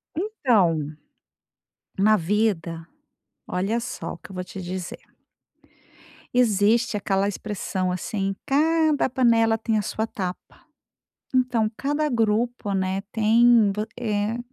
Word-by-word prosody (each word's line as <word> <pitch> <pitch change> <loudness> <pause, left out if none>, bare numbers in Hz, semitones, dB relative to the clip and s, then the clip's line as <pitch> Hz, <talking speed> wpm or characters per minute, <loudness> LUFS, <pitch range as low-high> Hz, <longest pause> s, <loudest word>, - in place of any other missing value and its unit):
Então, 250 - +2 1.2
na 215 +2 +5
vida 175 -4 -1 0.6
olha 195 +6 -1
só 240 - -5
o - - -10
que - - -14
eu - - -9
vou 180 - -3
te 190 +2 -8
dizer 180 0 -5 1.3
existe 225 -1 +3
aquela 195 -1 0
expressão 195 -3 -3
assim: 195 +2 -2
"Cada 310 +1 +2
panela 230 -3 +3
tem 225 0 0
a 210 - +1
sua 220 +2 -3
tapa". 185 -4 -6 0.7
Então, 250 -4 +2
cada 295 +2 0
grupo, 230 -2 0
né, 190 0 -1
tem 225 0 +5
vo 210 +1 -2
eh, 215 -1 -1
215 Hz, 115 wpm, -24 LUFS, 195-240 Hz, 1.3 s, na